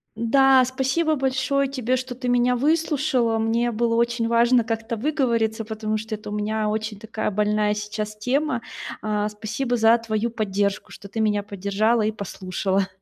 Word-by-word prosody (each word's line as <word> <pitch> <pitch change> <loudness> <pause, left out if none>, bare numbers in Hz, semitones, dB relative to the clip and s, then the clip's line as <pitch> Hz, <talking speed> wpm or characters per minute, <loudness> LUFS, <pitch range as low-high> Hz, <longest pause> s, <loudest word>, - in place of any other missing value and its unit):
М-да. 260 +3 +5
Спасибо 265 +5 0
большое 275 +1 0
тебе, 255 -2 -1
что 255 0 -5
ты 250 0 -5
меня 245 0 +3
выслушала. 290 -4 +1
Мне 230 +2 +1
было 230 +1 0
очень 235 0 +1
важно 235 +1 +4
как-то 225 +1 -3
выговориться, 230 -4 0
потому 215 0 -2
что 220 0 -4
это 210 0 -9
у - - -5
меня 210 +1 -1
очень 215 -1 -3
такая 220 0 -3
больная 210 +1 +1
сейчас 210 0 -4
тема. 255 +4 0 0.4
А, 210 -1 -1
спасибо 220 +4 -3
за 225 +1 +5
твою 230 0 -2
поддержку, 205 -3 -2
что 200 - -11
ты 225 - -5
меня 210 -2 +1
поддержала 205 +3 0
и 215 - +1
послушала. 195 -1 -2
225 Hz, 160 wpm, -23 LUFS, 210-250 Hz, 0.4 s, М-да